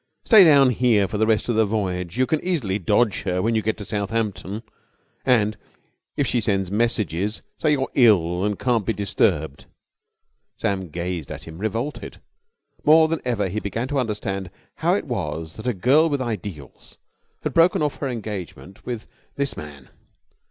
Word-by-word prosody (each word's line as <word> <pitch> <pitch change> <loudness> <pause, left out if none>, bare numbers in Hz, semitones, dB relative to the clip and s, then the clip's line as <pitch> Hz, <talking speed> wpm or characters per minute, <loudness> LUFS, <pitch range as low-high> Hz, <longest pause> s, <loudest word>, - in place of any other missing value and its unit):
"Stay 215 -4 +8
down 140 -6 +6
here 115 -4 +3
for 105 +2 -4
the 110 - +3
rest 110 -2 +1
of 120 - 0
the 110 - +4
voyage. 95 -4 -2
You 130 - +3
can 155 +3 -1
easily 130 - -1
dodge 105 +3 +2
her 90 -2 -1
when 115 +5 +1
you 110 - +2
get 110 +1 -1
to 105 - -7
Southampton. 105 0 -3 0.6
And, 110 -5 +2 0.6
if 145 - +2
she 120 -1 0
sends 95 -2 0
messages, 105 -3 -1 0.2
say 155 -2 +2
you're 135 -2 -1
ill 90 -8 +4
and 105 -1 0
can't 120 -4 +1
be 115 - -1
disturbed." 95 -7 0 0.9
Sam 95 -3 -2
gazed 85 -2 -4
at 75 -1 -7
him, 80 +1 -10
revolted. 115 +8 -4 0.6
More 160 +1 +6
than 165 0 -2
ever 115 -6 0
he 100 +4 -3
began 115 +4 -3
to 145 -1 0
understand 100 -5 -3 0.3
how - - +2
it - - -2
was 80 +1 -4
that 110 - -6
a - - +3
girl 140 - +4
with 145 -2 -1
ideals 100 - -6 0.5
had - - -2
broken 165 -1 +4
off 150 - -1
her 140 - -3
engagement 100 - -7
with 120 -3 -5 0.3
this 140 0 -2
man. 70 -3 -10
105 Hz, 175 wpm, -23 LUFS, 95-125 Hz, 0.9 s, Stay